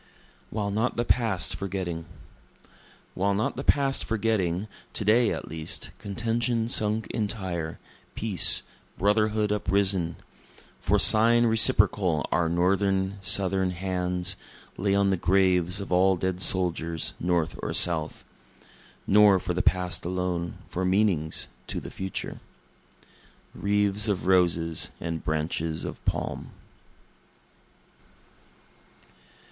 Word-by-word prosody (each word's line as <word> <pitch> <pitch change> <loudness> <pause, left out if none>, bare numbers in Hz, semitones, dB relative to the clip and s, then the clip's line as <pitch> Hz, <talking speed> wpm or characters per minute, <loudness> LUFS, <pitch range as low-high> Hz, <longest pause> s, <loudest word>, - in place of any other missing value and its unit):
While 100 -2 -3
Not 110 +5 -1
the 120 - 0
Past 110 -9 0
Forgetting 90 -4 -5 1.1
While 100 +2 0
not 110 - -1
the 135 - -5
past 140 -2 +1
forgetting, 105 -4 -1 0.3
To 105 - -2
day, 115 +2 +4
at - - -5
least, 80 0 -4
contention 115 +2 -2
sunk 110 -1 0
entire 95 -7 -4 0.4
peace, 105 -6 +6 0.3
brotherhood 105 +1 +1
uprisen; 95 -4 0 0.6
For - - +1
sign 115 +2 +6
reciprocal 105 -7 +3
our 85 -2 +1
Northern, 95 +2 0
Southern 95 -1 +1
hands, 90 0 -2 0.4
Lay 100 +1 0
on 100 -1 +2
the 95 - 0
graves 90 +1 +1
of 100 - -7
all 95 +1 +3
dead 95 +1 -3
soldiers, 85 -3 0
North 85 -2 -1
or - - -4
South, 80 -3 +1 0.8
(Nor 105 -1 +5
for 90 - -3
the 90 - 0
past 90 -2 0
alone 90 -1 -3
for 95 - -4
meanings 90 -5 0 0.2
to - - -4
the - - -10
future,) 95 -1 -6 1.1
Wreaths 105 +1 0
of 100 -3 -2
roses 85 -3 +1
and 80 -1 -5
branches 80 +1 -3
of - - -8
palm. - - -4
95 Hz, 110 wpm, -26 LUFS, 90-105 Hz, 1.1 s, peace